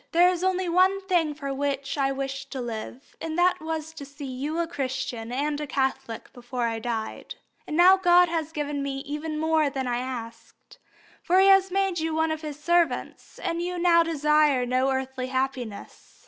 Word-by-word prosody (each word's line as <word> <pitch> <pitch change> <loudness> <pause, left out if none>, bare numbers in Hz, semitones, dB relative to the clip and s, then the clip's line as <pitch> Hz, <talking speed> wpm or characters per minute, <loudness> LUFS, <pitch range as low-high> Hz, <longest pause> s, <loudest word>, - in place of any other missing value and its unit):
There 350 +2 +6
was 360 0 -3
only 375 -1 +1
one 370 +3 +3
thing 345 -6 +1
for 280 -2 -4
which 275 0 -2
I 275 -2 +1
wished 270 0 -4
to 265 - -4
live, 240 +2 -7
and 320 0 -4
that 360 0 +3
was 320 0 -4
to 310 -3 -9
see 285 +1 -9
you 275 +5 -4
a 340 - +1
Christian 260 -6 -4
and 290 +3 -1
a 300 - -4
Catholic 265 -4 -2
before 245 0 -5
I 225 -1 -1
died. 225 -1 -4 0.3
And 305 - -3
God 360 0 +6
has 325 -2 -2
given 295 -2 -3
me 275 -1 -3
even 305 +2 -4
more 315 -1 +2
than 265 -1 -3
I 245 -1 -1
asked, 245 -3 -8 0.4
for 365 +2 +3
He 390 +1 +6
has 390 -1 +6
made 385 -2 0
you 320 0 -1
one 320 0 +1
of 315 0 -3
His 300 -2 -6
servants, 335 -4 0
and 335 +1 -2
you 360 +1 -3
now 340 -1 +5
desire 300 -4 +2
no 255 +2 +1
earthly 265 -1 -2
happiness. 260 -5 -4
295 Hz, 190 wpm, -26 LUFS, 265-335 Hz, 0.4 s, There